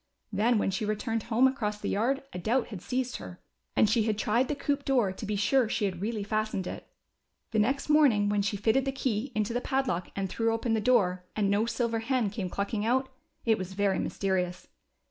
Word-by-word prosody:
Then 225 Hz, +4 st, +3 dB
when 200 Hz, -, +1 dB
she 190 Hz, -, -2 dB
returned 215 Hz, +2 st, -1 dB
home 245 Hz, +3 st, +5 dB
across 215 Hz, -6 st, -2 dB
the -, -, -3 dB
yard 260 Hz, +7 st, 0 dB
a 180 Hz, -, -4 dB
doubt 235 Hz, +8 st, 0 dB
had 200 Hz, -6 st, -7 dB
seized 255 Hz, +3 st, -2 dB
her^ 180 Hz, -, -9 dB, 0.4 s
and -, -, +5 dB
she 225 Hz, +2 st, +3 dB
had 215 Hz, -2 st, 0 dB
tried 235 Hz, +4 st, +1 dB
the 295 Hz, -, -1 dB
coop 285 Hz, 0 st, -1 dB
door 245 Hz, -9 st, +2 dB
to 190 Hz, -, -7 dB
be 210 Hz, -, -1 dB
sure 240 Hz, +5 st, +3 dB
that -, -, -3 dB
she 210 Hz, -, +1 dB
had 185 Hz, -3 st, -3 dB
really 215 Hz, 0 st, -2 dB
fastened 215 Hz, -2 st, -1 dB
it. -, -, -7 dB, 0.6 s
The 220 Hz, -, +1 dB
next 265 Hz, +6 st, +1 dB
morning 280 Hz, -9 st, +4 dB
when 205 Hz, 0 st, +2 dB
she 200 Hz, +1 st, -1 dB
fitted 225 Hz, +6 st, +2 dB
the 270 Hz, -, 0 dB
key 260 Hz, -2 st, -2 dB
into 215 Hz, +1 st, 0 dB
the 245 Hz, -, 0 dB
padlock 265 Hz, -, -1 dB
and 195 Hz, -1 st, -1 dB
threw 225 Hz, +4 st, 0 dB
open 225 Hz, 0 st, -1 dB
the 220 Hz, -, +1 dB
door, 185 Hz, -6 st, +2 dB
and 200 Hz, -2 st, +1 dB
no 210 Hz, +3 st, +2 dB
silver 235 Hz, -1 st, 0 dB
hen 230 Hz, -3 st, 0 dB
came 195 Hz, -3 st, -3 dB
clucking 200 Hz, +3 st, -2 dB
out, 260 Hz, +4 st, +1 dB, 0.4 s
it 225 Hz, -3 st, +3 dB
was 185 Hz, 0 st, -5 dB
very 195 Hz, -1 st, +1 dB
mysterious. 180 Hz, -2 st, -2 dB
220 Hz, 225 wpm, -29 LUFS, 200-250 Hz, 0.6 s, home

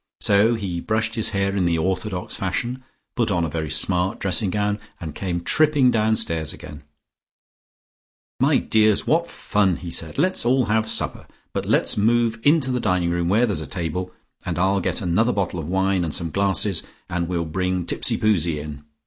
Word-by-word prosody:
So 105 Hz, +3 st, +4 dB
he 95 Hz, -6 st, -3 dB
brushed 110 Hz, +3 st, -1 dB
his 110 Hz, -1 st, -1 dB
hair 100 Hz, -1 st, -1 dB
in 95 Hz, -3 st, +1 dB
the 85 Hz, -1 st, +2 dB
orthodox 95 Hz, +2 st, -2 dB
fashion, 120 Hz, +7 st, -3 dB, 0.3 s
put 120 Hz, -3 st, +1 dB
on 85 Hz, -4 st, +1 dB
a -, -, -3 dB
very 80 Hz, 0 st, -3 dB
smart 90 Hz, -, 0 dB
dressing 95 Hz, +1 st, 0 dB
gown, 105 Hz, +2 st, -1 dB, 0.2 s
and 80 Hz, -3 st, -6 dB
came 85 Hz, -1 st, -3 dB
tripping 145 Hz, -, +3 dB
downstairs 105 Hz, -9 st, 0 dB
again. 75 Hz, -2 st, -10 dB, 1.6 s
"My -, -, +4 dB
dears, 110 Hz, -1 st, +3 dB
what 170 Hz, +2 st, +1 dB
fun!" 100 Hz, -4 st, +1 dB
he 85 Hz, -2 st, -7 dB
said. 80 Hz, -1 st, -1 dB
"Let's 185 Hz, +6 st, +1 dB
all 125 Hz, +1 st, +3 dB
have 110 Hz, 0 st, +1 dB
supper. -, -, -1 dB, 0.3 s
But -, -, -3 dB
let's -, -, +2 dB
move 115 Hz, +1 st, +2 dB
into 145 Hz, -2 st, +3 dB
the 125 Hz, -, 0 dB
dining 90 Hz, -5 st, +1 dB
room, 85 Hz, 0 st, 0 dB
where 110 Hz, +6 st, +4 dB
there's 100 Hz, -9 st, -2 dB
a 80 Hz, -, -6 dB
table, 90 Hz, +3 st, -4 dB, 0.3 s
and -, -, -3 dB
I'll 95 Hz, +2 st, +2 dB
get 110 Hz, -, -1 dB
another 110 Hz, +8 st, +2 dB
bottle 95 Hz, -3 st, -2 dB
of 80 Hz, -, -5 dB
wine, 95 Hz, 0 st, +1 dB
and 80 Hz, -3 st, -1 dB
some 85 Hz, -3 st, -3 dB
glasses, 100 Hz, 0 st, +1 dB, 0.3 s
and 85 Hz, -1 st, -2 dB
we'll 85 Hz, -1 st, -1 dB
bring 90 Hz, +2 st, -1 dB
Tipsipoozie 85 Hz, -5 st, +1 dB
in. 75 Hz, -1 st, -8 dB
95 Hz, 180 wpm, -22 LUFS, 85-110 Hz, 1.6 s, So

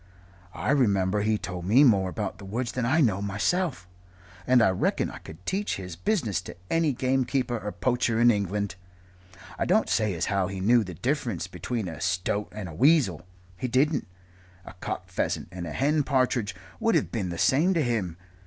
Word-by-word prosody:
I -, -, -1 dB
remember 105 Hz, -7 st, +2 dB
he 110 Hz, +1 st, +1 dB
told 90 Hz, -3 st, -6 dB
me 120 Hz, +9 st, +6 dB
more 100 Hz, -8 st, +4 dB
about 90 Hz, 0 st, -4 dB
the 100 Hz, -, -9 dB
woods 120 Hz, +4 st, -3 dB
than 125 Hz, -2 st, -1 dB
I 160 Hz, +6 st, +3 dB
know 105 Hz, -8 st, +2 dB
myself 105 Hz, -, -1 dB, 0.6 s
and 125 Hz, 0 st, +6 dB
I 95 Hz, -, +4 dB
reckon 95 Hz, -, 0 dB
I -, -, -9 dB
could 80 Hz, +1 st, -13 dB
teach 200 Hz, +2 st, -1 dB
his 90 Hz, -3 st, -7 dB
business 110 Hz, -, 0 dB
to -, -, -10 dB
any 165 Hz, -2 st, +2 dB
gamekeeper 130 Hz, -1 st, 0 dB
or 105 Hz, -1 st, -5 dB
poacher 115 Hz, +4 st, 0 dB
in 120 Hz, 0 st, +6 dB
England. 100 Hz, -1 st, -1 dB, 0.9 s
I -, -, +1 dB
don't -, -, +3 dB
say 105 Hz, -4 st, +1 dB
as 85 Hz, -, -1 dB
how 100 Hz, -2 st, 0 dB
he 95 Hz, 0 st, -5 dB
knew 115 Hz, +5 st, +4 dB
the 90 Hz, -3 st, -8 dB
difference 120 Hz, -, -1 dB
between 95 Hz, +4 st, -4 dB
a 80 Hz, -3 st, -7 dB
stoat 95 Hz, +3 st, -1 dB
and 105 Hz, -3 st, -6 dB
a 85 Hz, -, -8 dB
weasel 100 Hz, -, +3 dB, 0.3 s
he 125 Hz, -, -3 dB
didn't. 140 Hz, +5 st, +1 dB, 0.6 s
A -, -, -10 dB
cock 90 Hz, -, -5 dB
pheasant -, -, -2 dB
and 90 Hz, -1 st, -6 dB
a -, -, -5 dB
hen 150 Hz, -, +2 dB
partridge 125 Hz, -7 st, 0 dB, 0.2 s
would 230 Hz, 0 st, +2 dB
have -, -, +1 dB
been 100 Hz, -6 st, -2 dB
the 85 Hz, -, -5 dB
same 165 Hz, -, +3 dB
to 160 Hz, -, +2 dB
him. 105 Hz, -9 st, -1 dB
110 Hz, 190 wpm, -27 LUFS, 95-130 Hz, 0.9 s, me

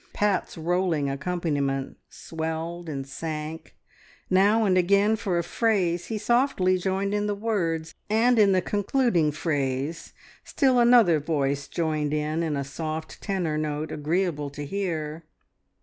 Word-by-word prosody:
Pat's 205 Hz, -5 st, 0 dB
rolling 165 Hz, -4 st, 0 dB
accompaniment 140 Hz, -3 st, -2 dB
swelled 165 Hz, +1 st, -5 dB
and 135 Hz, -3 st, -4 dB
sank; 155 Hz, +2 st, -6 dB, 0.6 s
now 205 Hz, +4 st, +4 dB
and 190 Hz, -2 st, +3 dB
again 200 Hz, +4 st, +3 dB
for 190 Hz, -5 st, -1 dB
a 170 Hz, -, 0 dB
phrase 180 Hz, -6 st, 0 dB
he 220 Hz, -, -3 dB
softly 235 Hz, -4 st, +2 dB
joined 195 Hz, +2 st, -1 dB
in 210 Hz, 0 st, 0 dB
the 205 Hz, -, -1 dB
words, 170 Hz, -7 st, -2 dB, 0.2 s
and 230 Hz, +2 st, +3 dB
in 205 Hz, -2 st, +6 dB
the 185 Hz, -2 st, +2 dB
concluding 205 Hz, -, +1 dB
phrase 145 Hz, 0 st, -2 dB, 0.3 s
still 260 Hz, -4 st, +2 dB
another 235 Hz, -9 st, +6 dB
voice 140 Hz, -2 st, -1 dB
joined 155 Hz, -3 st, -1 dB
in 155 Hz, +2 st, -1 dB
in 155 Hz, -3 st, -1 dB
a 140 Hz, -, -1 dB
soft 155 Hz, +3 st, -6 dB
tenor 175 Hz, -7 st, -1 dB
note 150 Hz, 0 st, -3 dB
agreeable 155 Hz, -1 st, -1 dB
to 145 Hz, +1 st, -7 dB
hear. 165 Hz, -3 st, -3 dB
170 Hz, 135 wpm, -26 LUFS, 150-200 Hz, 0.6 s, in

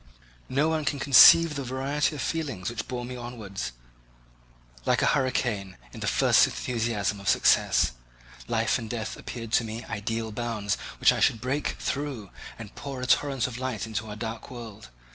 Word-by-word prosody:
No 140 Hz, +4 st, +2 dB
one 160 Hz, -1 st, 0 dB
can 145 Hz, 0 st, -1 dB
conceive 150 Hz, +4 st, +8 dB
the 140 Hz, -2 st, -4 dB
variety 135 Hz, +4 st, -1 dB
of 140 Hz, -, -4 dB
feelings 140 Hz, -, -3 dB
which 120 Hz, -, -5 dB
bore 125 Hz, -1 st, -4 dB
me 125 Hz, +1 st, -7 dB
onwards, 110 Hz, -, -6 dB, 1.1 s
like -, -, +2 dB
a -, -, +3 dB
hurricane, 115 Hz, -7 st, -1 dB, 0.2 s
in -, -, -9 dB
the -, -, -3 dB
first -, -, +5 dB
enthusiasm 115 Hz, -4 st, -2 dB
of 100 Hz, -, -2 dB
success. -, -, +3 dB, 0.6 s
Life 115 Hz, +1 st, +1 dB
and 115 Hz, -2 st, -7 dB
death 110 Hz, -2 st, -4 dB
appeared 115 Hz, -2 st, -7 dB
to 115 Hz, -, +3 dB
me 115 Hz, +1 st, -6 dB
ideal 110 Hz, +2 st, -3 dB
bounds, 110 Hz, -3 st, -2 dB, 0.2 s
which -, -, +5 dB
I -, -, -3 dB
should -, -, +4 dB
first 110 Hz, -, -14 dB
break 135 Hz, +3 st, -1 dB
through, 135 Hz, -8 st, -4 dB, 0.3 s
and 110 Hz, -3 st, -10 dB
pour 140 Hz, -2 st, -7 dB
a -, -, -2 dB
torrent 135 Hz, -1 st, +2 dB
of 125 Hz, -1 st, -5 dB
light 130 Hz, -5 st, -3 dB
into 110 Hz, 0 st, -4 dB
our 105 Hz, -, -6 dB
dark 115 Hz, +3 st, -6 dB
world. 115 Hz, -, -10 dB
120 Hz, 180 wpm, -27 LUFS, 110-135 Hz, 1.1 s, conceive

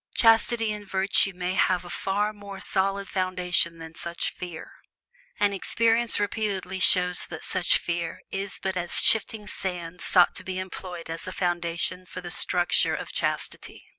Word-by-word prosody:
Chastity 225 Hz, 0 st, +4 dB
and 210 Hz, -1 st, -8 dB
virtue 195 Hz, +1 st, +2 dB
must 180 Hz, +1 st, -2 dB
have 180 Hz, -1 st, +2 dB
a -, -, -9 dB
far 205 Hz, +2 st, -1 dB
more 200 Hz, -2 st, -9 dB
solid 195 Hz, +1 st, 0 dB
foundation 180 Hz, -2 st, +1 dB
than 165 Hz, 0 st, -10 dB
such 170 Hz, +1 st, -3 dB
fear; 175 Hz, -3 st, -8 dB, 0.7 s
and 205 Hz, -1 st, +3 dB
experience 230 Hz, +4 st, +3 dB
repeatedly 200 Hz, -3 st, -2 dB
shows 180 Hz, -2 st, +4 dB
that -, -, -7 dB
such 185 Hz, -2 st, +2 dB
fear 170 Hz, -1 st, -4 dB
is 195 Hz, 0 st, -4 dB
but 190 Hz, -1 st, -1 dB
as 175 Hz, -1 st, -3 dB
shifting 220 Hz, -1 st, +4 dB
sand 180 Hz, -3 st, -4 dB
sought 180 Hz, -2 st, +4 dB
to -, -, -4 dB
be 185 Hz, -1 st, -4 dB
employed 185 Hz, -2 st, -6 dB
as 165 Hz, +2 st, -6 dB
a -, -, -4 dB
foundation 175 Hz, 0 st, -2 dB
for -, -, -8 dB
the 175 Hz, -1 st, -7 dB
structure 175 Hz, 0 st, +1 dB
of -, -, -6 dB
chastity. -, -, -3 dB
185 Hz, 160 wpm, -26 LUFS, 175-200 Hz, 0.7 s, Chastity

